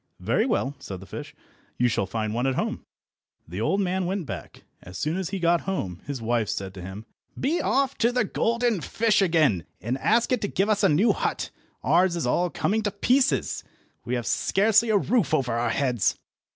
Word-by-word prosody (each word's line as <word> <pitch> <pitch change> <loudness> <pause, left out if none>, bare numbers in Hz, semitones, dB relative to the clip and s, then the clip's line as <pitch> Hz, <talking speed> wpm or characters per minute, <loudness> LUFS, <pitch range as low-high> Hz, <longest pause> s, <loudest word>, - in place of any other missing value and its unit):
"Very 225 - +1
well," 170 - 0
said 95 -2 -7
the 95 - -11
fish, - - -8 0.4
"you 125 - +3
shall 100 -4 0
find 110 -1 -2
one 120 +3 0
at 135 - 0
home." - - -2 0.6
The 90 +6 -5
old 195 - +1
man 185 -1 0
went 190 -2 -2
back. - - -8 0.2
As 90 +1 -9
soon 155 - -1
as 185 -2 -2
he 195 - -3
got 170 -1 +2
home 95 - -3
his 140 -3 -3
wife 115 -2 0
said 95 -1 -3
to 95 - -9
him— 95 +4 -8 0.3
"Be 315 +6 +1
off 270 -1 +1
to 235 +1 +3
the 250 -1 +2
golden 235 -1 0
fish 215 +2 +2
again, 155 - +3 0.2
and 125 +4 -3
ask 230 - +2
it 250 - +2
to 205 - 0
give 195 +2 0
us 210 -1 +2
a - - +5
new 200 +9 +4
hut. - - -2 0.3
Ours 175 +5 +3
is 170 - -2
all 175 +8 +1
coming 215 +6 0
to 210 - 0
pieces. 255 +7 +1 0.4
We 125 - -2
have 120 -2 -3
scarcely 220 - +3
a 215 - +4
roof 205 - +2
over 125 -3 0
our 120 +1 0
heads." 120 -3 +1
170 Hz, 205 wpm, -25 LUFS, -, 0.6 s, a